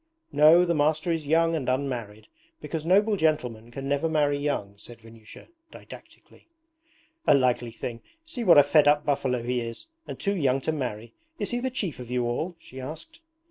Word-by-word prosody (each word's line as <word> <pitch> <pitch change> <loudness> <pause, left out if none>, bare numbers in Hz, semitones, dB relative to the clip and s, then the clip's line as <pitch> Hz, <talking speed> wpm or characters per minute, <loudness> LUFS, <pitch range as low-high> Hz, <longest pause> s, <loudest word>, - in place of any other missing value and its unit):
'No. 155 +5 +6
The 170 - +1
master 155 +2 +1
is 160 -3 -3
young 165 +2 +2
and 135 -5 -2
unmarried, 120 -6 -3 0.3
because 155 +1 -5
noble 205 +4 +4
gentlemen 125 -9 -1
can 135 +3 -7
never 145 +3 0
marry 150 -2 +1
young,' 140 -9 -2
said 115 +3 -14
Vanyusha 115 -1 -15 0.2
didactically. - - -15 0.8
'A - - +7
likely 125 -3 +1
thing! 115 +1 -7 0.2
See 270 -7 -6
what 175 -7 +6
a 145 - +9
fed 145 +1 +4
up 150 +1 +3
buffalo 130 -4 0
he 125 0 -1
is 115 0 -7 0.2
and - - -7
too 200 0 -1
young 135 -6 +1
to 160 - -1
marry! 120 -7 -5 0.2
Is - - -4
he 240 - -1
the 260 +1 -2
chief 205 - -4
of 125 -2 -9
you 125 -1 -1
all?' 155 +9 -3
she 130 -5 -11
asked. 160 - -9
145 Hz, 185 wpm, -26 LUFS, 120-160 Hz, 0.8 s, a